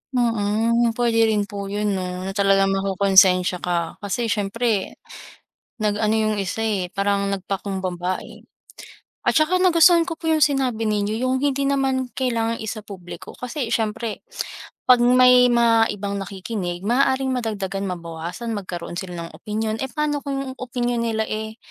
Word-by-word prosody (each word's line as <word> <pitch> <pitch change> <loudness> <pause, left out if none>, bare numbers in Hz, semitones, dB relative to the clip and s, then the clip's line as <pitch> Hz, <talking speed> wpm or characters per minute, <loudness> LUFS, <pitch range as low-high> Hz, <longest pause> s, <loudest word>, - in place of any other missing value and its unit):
Mm. 230 0 +1
Puwede 230 -2 +3
rin 210 -2 +1
po 200 0 -6
'yon 205 +1 -1
'no, 185 -1 -3
na 195 - -3
talagang 195 -1 +3
makokonsensya 190 -1 +4
ka. 170 -2 -2
Kasi 220 +2 -2
siyempre 210 0 -1 0.8
nag-ano 215 0 +1
'yong 215 -1 +1
isa 190 - -4
eh, 195 -5 -1
parang 200 0 0
nagpakumbaba 185 -2 -3
eh. - - -13 0.8
At - - +3
saka 315 +4 +2
nagustuhan 345 -2 +5
ko 345 - -3
po 325 0 -4
'yong 315 -1 +4
sinabi 255 -6 0
ninyo. 210 0 0
'Yong 255 +2 0
hindi 280 -1 0
naman 265 -3 0
kailangang 230 -3 -1
isa-publiko. 205 -5 -8
kasi 250 -1 -4
siyempre 220 0 -2 0.7
'pag 250 -1 +7
may 250 0 +6
mga 230 -1 +4
ibang 200 0 -4
nakikinig 190 -2 -5
maaaring 265 +2 +2
madagdagan, 200 -5 -3
mabawasan, 170 +5 -5
magkaroon 175 -3 -5
sila 175 -3 -6
ng - - -13
opinyon, 215 +1 -3
eh 265 - -1
paano 295 +1 -1
kung 275 -2 -4
opinyon 245 -1 -2
nila 220 -1 0
eh, 220 0 -4
220 Hz, 145 wpm, -22 LUFS, 195-245 Hz, 0.8 s, pag